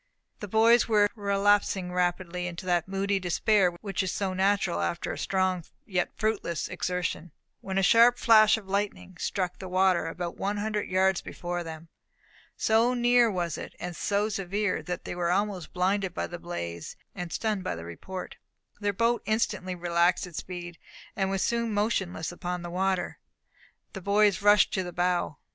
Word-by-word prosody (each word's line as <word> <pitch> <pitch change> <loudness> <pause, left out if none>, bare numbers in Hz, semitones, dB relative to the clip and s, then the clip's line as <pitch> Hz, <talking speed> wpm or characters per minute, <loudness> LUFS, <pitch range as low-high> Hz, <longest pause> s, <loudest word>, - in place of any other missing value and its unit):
The 210 - -6
boys 225 +4 +5
were 210 -2 +4
relapsing 200 -3 +1
rapidly 180 0 -1
into 175 +1 -7
that 175 -2 +1
moody 195 +1 0
despair 190 +2 +2
which 200 -3 -2
is 190 -1 -1
so 195 -2 -2
natural 190 -1 +1
after 170 - -2
strong 185 -2 0 0.2
yet 180 -3 -1
fruitless 215 -6 -1
exertion, 180 -2 -3 0.3
when 190 0 -4
a 195 - +2
sharp 235 +4 +6
flash 220 -1 +6
of 210 -3 -10
lightning 200 -1 -2
struck 185 -3 -1
in - - -29
the 190 - -7
water 185 -2 +2
about 170 +1 -5
one 205 +1 -2
hundred 210 0 -2
yards 190 0 +2
before 175 0 -5
them. 160 0 -8 0.7
So 230 +3 +3
near 240 -1 +4
was 175 -5 -2
it, - - -8
and 175 -1 -5
so 205 +5 0
severe, 200 -1 -1
that 180 -1 -5
they - - -4
were 175 -1 -1
almost 195 -1 -1
blinded 190 0 0
by - - -1
the 175 - -7
blaze, 85 - -6 0.2
and 175 -1 -6
stunned 215 -4 -1
by - - -2
the 85 0 -8
report. 180 - -7 0.4
Their 205 -1 0
boat 230 +4 +1
instantly 210 -4 0
relaxed 175 +1 +2
its 175 -3 -6
speed, 175 -2 -8 0.4
and 195 -1 0
was 195 -1 0
soon 235 -2 0
motionless 190 -6 -1
upon 180 0 -4
the 175 - -6
water. 190 0 -1 0.7
The 195 - -7
boys 205 +1 +3
rushed 205 +1 +5
to 190 - +1
the 175 -1 -6
bow. 175 -4 0
190 Hz, 170 wpm, -28 LUFS, 175-205 Hz, 0.7 s, sharp